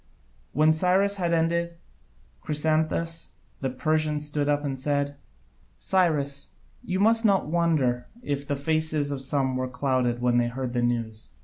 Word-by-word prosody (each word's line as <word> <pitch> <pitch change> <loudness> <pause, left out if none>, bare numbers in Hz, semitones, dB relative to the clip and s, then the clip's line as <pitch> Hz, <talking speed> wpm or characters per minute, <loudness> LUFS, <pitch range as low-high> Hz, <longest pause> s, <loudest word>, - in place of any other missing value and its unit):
When 155 +1 +4
Cyrus 190 +4 +2
had 175 -3 0
ended, 170 +1 0 0.7
Chrysantas 160 +2 -1 0.3
the 135 - -1
Persian 155 +3 0
stood 150 -1 -1
up 145 0 +1
and 135 -2 -3
said: 145 +1 -1 0.6
"Cyrus, 150 -7 0 0.3
you 185 +1 -2
must 225 +3 +4
not 195 -8 +3
wonder 150 -8 +1 0.2
if 140 - -3
the 145 - 0
faces 155 0 0
of 140 -2 -3
some 135 -1 0
were 130 0 -2
clouded 125 -2 0
when 125 0 +2
they 120 0 +3
heard 125 0 -4
the 120 - 0
news. 115 -2 -2
145 Hz, 145 wpm, -26 LUFS, 130-165 Hz, 0.7 s, When